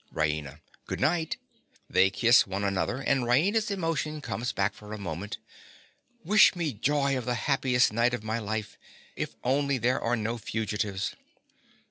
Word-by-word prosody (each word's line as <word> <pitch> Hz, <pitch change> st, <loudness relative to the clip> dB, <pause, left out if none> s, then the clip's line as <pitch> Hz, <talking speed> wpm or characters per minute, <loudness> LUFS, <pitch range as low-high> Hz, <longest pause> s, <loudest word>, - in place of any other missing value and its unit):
RAINA. 75 Hz, -1 st, -2 dB, 0.3 s
Good -, -, -4 dB
night. 160 Hz, 0 st, +1 dB, 0.5 s
(They 95 Hz, +1 st, +4 dB
kiss 115 Hz, +4 st, +4 dB
one 95 Hz, +1 st, -3 dB
another, 100 Hz, +5 st, 0 dB
and 135 Hz, -1 st, +2 dB
Raina's 180 Hz, -, +2 dB
emotion 165 Hz, -5 st, -2 dB
comes 120 Hz, -3 st, -3 dB
back 100 Hz, +1 st, 0 dB
for 105 Hz, 0 st, -10 dB
a -, -, -4 dB
moment.) 95 Hz, +1 st, -5 dB, 0.9 s
Wish 210 Hz, +3 st, +6 dB
me 165 Hz, -5 st, -2 dB
joy 140 Hz, +5 st, +1 dB
of 125 Hz, -3 st, -3 dB
the 125 Hz, -, 0 dB
happiest 130 Hz, -4 st, +2 dB
night 120 Hz, +2 st, +2 dB
of 110 Hz, -, -8 dB
my 110 Hz, +1 st, -2 dB
life—if 110 Hz, 0 st, -6 dB
only 140 Hz, +2 st, +1 dB
there 125 Hz, +2 st, +1 dB
are 120 Hz, +1 st, +1 dB
no 115 Hz, +1 st, -3 dB
fugitives. 105 Hz, -3 st, -2 dB
120 Hz, 150 wpm, -28 LUFS, 105-140 Hz, 0.9 s, Wish